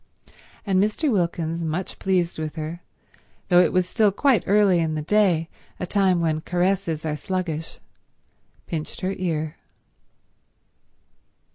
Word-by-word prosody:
And 190 -2 +2
Mr. 235 +8 0
Wilkins, 170 -4 -1
much 165 +4 -3
pleased 180 -4 0
with 155 0 -4
her, 160 +2 -5 0.7
though 175 -1 +6
it 180 - +4
was 185 -1 +1
still 215 +1 +3
quite 245 0 +2
early 200 -3 +4
in 160 -1 0
the 155 - -3
day, 180 -3 +2 0.3
a - - -2
time 185 -2 +2
when 155 -1 0
caresses 180 -2 -1
are 150 -1 -1
sluggish, 165 -2 -4 0.9
pinched 155 -2 -5
her 190 +1 -1
ear. 160 -4 -2
175 Hz, 130 wpm, -24 LUFS, 160-190 Hz, 0.9 s, though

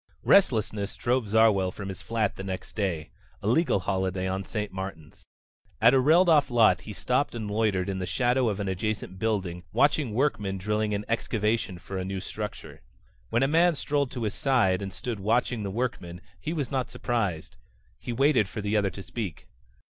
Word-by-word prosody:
Restlessness 110 - +3
drove 125 -2 0
Zarwell 105 -3 +4
from 100 +1 -7
his 95 - -7
flat 110 -3 -1
the 95 - -7
next 95 -1 -6
day 90 -7 -2 0.3
a - - -10
legal 125 - +2
holiday 95 0 -1
on 95 +1 -2
St. 105 +1 -4
Martin's. 95 -5 -8 0.6
At 115 +4 +6
a 135 - +5
railed 160 +7 +5
off 150 -4 +5
lot 110 -7 +4
he 105 - -8
stopped 125 +5 0
and 110 -3 -4
loitered 105 -4 +1
in 95 -1 -2
the 90 - -3
shadow 125 -1 +2
of 105 -1 -3
an 100 - -2
adjacent 95 0 -3
building 95 -6 -1
watching 130 -1 +2
workmen 105 -8 0
drilling 105 +2 -1
an 105 +1 -4
excavation 110 -3 -1
for 95 +2 -6
a - - -2
new 95 +1 -3
structure. 105 +3 -7 0.5
When 120 +3 +2
a - - +3
man 165 +3 +4
strolled 145 -1 0
to 120 - -4
his 105 - -1
side 115 -9 +2
and 100 -1 -4
stood 105 +4 -5
watching 115 +3 +1
the 100 - -3
workmen, 95 -6 -3 0.2
he 155 - -4
was 150 -7 -3
not 130 -2 -1
surprised. 105 -9 -2 0.4
He - - -5
waited 125 -5 +3
for 105 - -5
the 105 +1 -1
other 100 -2 +2
to 95 +1 -9
speak. 90 -1 -6
105 Hz, 190 wpm, -27 LUFS, 95-120 Hz, 0.6 s, At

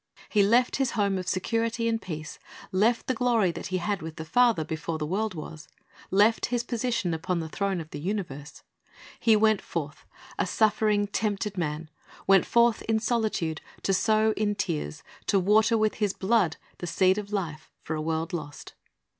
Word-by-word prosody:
He 210 - +3
left 235 +5 +3
His 265 -3 0
home 200 -2 +1
of 185 - -6
security 230 +5 0
and 225 -1 0
peace, 155 -3 -7 0.3
left 220 +5 +2
the 260 - 0
glory 230 -6 +2
that - - -6
He 185 - -1
had 200 +1 -2
with 160 0 -7
the 160 -1 -7
Father 235 -5 +3
before 160 +1 -3
the 155 - -3
world 200 +4 -1
was, 155 0 -8 0.4
left 210 +4 +3
His 240 -1 -1
position 235 -7 -1
upon 170 +2 -1
the 160 - -4
throne 195 +2 -1
of 160 -1 -8
the 145 - -6
universe. 150 -6 -5 0.6
He 225 -2 +5
w^ent 215 -1 +3
forth, 150 -3 -5 0.3
a - - +1
suffering, 215 -1 +2
tempted 205 0 -2
man; 155 -2 -3 0.4
went 195 -1 +5
forth 235 -1 +3
in 220 - +3
solitude, 215 -8 -1 0.2
to 195 - +1
sow 220 +2 +3
in 205 -1 0
tears, 165 - -3 0.2
to 195 - +3
water 215 +5 +4
with 215 -1 +2
His 205 -3 -1
blood, 190 -5 +1 0.2
the 175 - -5
seed 185 +4 +3
of 205 0 -8
life 170 -7 -4
for 160 - -4
a 155 - -3
world 160 +1 -2
lost. 145 -4 -6
200 Hz, 180 wpm, -27 LUFS, 165-220 Hz, 0.6 s, He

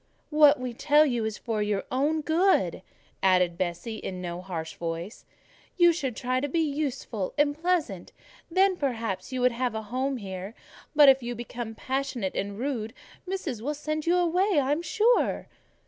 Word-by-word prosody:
"What 300 -2 +6
we 250 -1 -4
tell 295 +5 +4
you 240 -6 0
is 220 -1 -3
for 225 -3 -2
your 205 -1 0 0.4
good," 355 +5 +2 0.4
added 180 -2 +3
Bessie, 185 +5 -3
in 185 -3 -6
no 175 -1 -5
harsh 165 -4 -5
voice, 170 +6 -6 0.5
"you 345 -1 +6
should 270 -8 -3
try 255 +1 -1
to 285 +2 -2
be 335 - -1
useful 280 - -2
and 290 0 +3
pleasant, 315 - -1 0.4
then, 375 +2 +3
perhaps, 225 - -3
you 255 -1 -2
would 250 0 +4
have 240 0 -2
a 220 - -3
home 260 +5 -2
here; 195 0 -7 0.4
but 295 -1 +8
if 270 0 +7
you 240 0 -4
become 235 -1 -6
passionate 260 -6 -2
and 200 0 -3
rude, 240 -2 -3 0.3
Missis 340 - -3
will 295 +5 -2
send 305 +2 -3
you 345 - +4
away, 360 +2 +2
I 270 0 0
am 300 +3 +1
sure." 440 +7 +2
255 Hz, 170 wpm, -27 LUFS, 210-300 Hz, 0.5 s, but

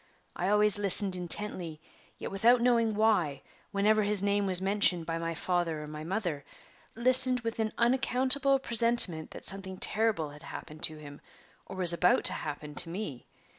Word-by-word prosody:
I 180 - -4
always 210 0 +1
listened 200 -1 +3
intently, 175 -2 +1 0.4
yet - - -9
without 230 +5 +1
knowing 235 -3 -1
why, 200 -10 -1 0.3
whenever 210 +2 0
his 205 -1 0
name 200 0 -2
was 185 -2 -2
mentioned 190 -3 0
by 165 0 -5
my 165 0 -6
father 170 -3 -4
or - - -9
my 150 0 -10
mother 175 -5 -5 0.5
listened 255 +1 +3
with 230 0 -7
an 220 -1 -3
unaccountable 260 +3 +1
presentiment 230 -10 +4
that - - -13
something 190 -1 -4
terrible 210 -8 -1
had 150 +1 -16
happened 155 -2 -12
to 155 - -6
him, 145 -1 -14 0.5
or - - -11
was 180 -2 +4
about 180 +1 0
to - - +4
happen 150 0 -8
to 165 - +2
me. 170 - -9
195 Hz, 170 wpm, -27 LUFS, 165-225 Hz, 0.5 s, presentiment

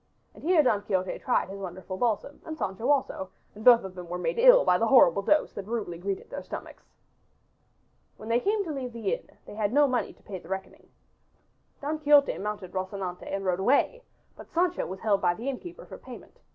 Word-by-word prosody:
And - - -15
here 335 -1 +4
Don 215 -6 +2
Quixote 190 -3 -2
tried 255 - +1
his 195 +1 -7
wonderful 185 0 -6
balsam 235 +6 -1
and 315 -1 -7
Sancho 210 +2 -3
also, 265 -9 0 0.2
and 215 - -11
both 240 -2 +7
of 190 -1 -7
them 180 -2 -9
were 180 - -3
made 180 - -2
ill - - +7
by 180 - +4
the 230 - +2
horrible 200 -8 +6
dose 300 +9 +2
that 200 -1 -7
rudely 215 -7 -4
greeted 195 +1 -4
their - - -5
stomachs. - - -9 1.3
When 215 - -10
they 230 +1 +2
came 410 - 0
to 330 - -5
leave 255 -4 -5
the 225 -4 -2
inn - - -6 0.2
they - - -10
had 210 -1 -1
no 290 +2 +5
money 250 -2 -1
to - - -27
pay 190 -3 -7
the 165 - -16
reckoning. 190 0 -6 0.9
Don 300 +2 -2
Quixote 290 -2 +5
mounted 205 -3 -5
Rocinante 185 -1 -4
and 195 0 -3
rode 180 -1 +1
away, 285 - +2 0.3
but - - -13
Sancho 355 +1 0
was 190 +1 -7
held 210 -3 +2
by 175 -1 +2
the 235 +7 -7
innkeeper 345 - -6
for - - -11
payment. - - -12
215 Hz, 210 wpm, -27 LUFS, 190-285 Hz, 1.3 s, both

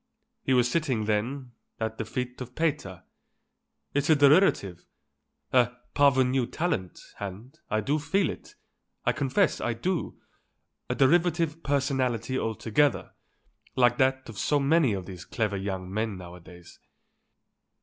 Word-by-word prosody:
He 130 - +1
was 125 -1 +4
sitting, 130 -6 0
then, 120 +5 -2 0.3
at 110 0 -3
the 115 - -2
feet 125 +3 -5
of 125 0 -8
Pater. 150 - -2 0.9
It's 145 +2 0
a 155 - +7
derivative, 140 - +3 0.7
a 125 -1 +4 0.2
parvenu 130 -3 +3
talent, 155 - -2 0.2
and, 100 +6 -8
I 110 +1 +1
do 145 +8 0
feel 160 +5 +1
it, - - -12 0.5
I - - +4
confess 150 +7 +1
I 120 - 0
do, 180 +9 -3 0.7
a - - 0
derivative 165 +2 +2
personality 130 -4 0
altogether, 115 +5 0 0.6
like 120 -1 +3
that 130 0 +2
of 115 -3 -8
so 145 - +2
many 140 -3 +3
of 95 -2 -4
these 90 -2 -9
clever 105 -1 -2
young 95 -1 -4
men 110 -1 -2
nowadays. 90 -1 -13
125 Hz, 130 wpm, -27 LUFS, 105-145 Hz, 0.9 s, a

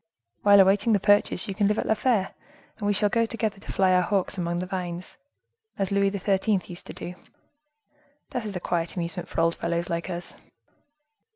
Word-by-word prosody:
While 205 -1 +7
awaiting 195 +4 +4
the 205 - +4
purchase, 205 -2 +3
you 195 - -3
can 205 0 +2
live 210 +1 +1
at - - -1
La - - +3
Fere, 220 -4 +1 0.5
and 205 - -2
we - - +3
shall 210 +1 +2
go 230 +2 +1
together 220 -3 -3
to - - -8
fly 190 -1 +3
our 180 - +5
hawks 195 +1 0
among 175 -2 -2
the 180 - -2
vines, 180 -1 -5 0.6
as 195 -1 -1
Louis 200 0 +3
XIII. 200 +1 +1
used 175 0 -9
to - - -7
do. 175 - -7 1.2
That 245 - -2
is 210 -2 -5
a - - -2
quiet 170 -1 -2
amusement 170 -1 -4
for - - -1
old 165 0 +3
fellows 170 0 -2
like 170 +2 -2
us." 175 -1 -6
195 Hz, 200 wpm, -26 LUFS, 175-205 Hz, 1.2 s, While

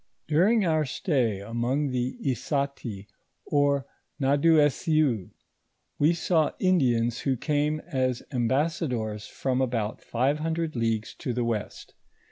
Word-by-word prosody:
During 185 +10 +4
onr 155 -5 +1
stay 120 - 0
among 120 +7 -1
tho 125 0 -1
Issati 135 -6 -2 0.4
or 145 -2 +2 0.3
T^adouossion, 145 - +3 0.7
wo 150 +3 +5
saw 165 -2 +1
Indians 125 - +2
who 130 0 0
came 150 +2 0
as 130 -6 -1
emlmsnadors 125 -4 -1
from 130 -1 -1
about 115 -4 -1
five 135 +5 0
hundred 160 0 -2
leagues 115 -2 -1
to 130 -5 -2
tho 120 0 -1
west. 115 -3 -4
135 Hz, 110 wpm, -27 LUFS, 120-155 Hz, 0.7 s, wo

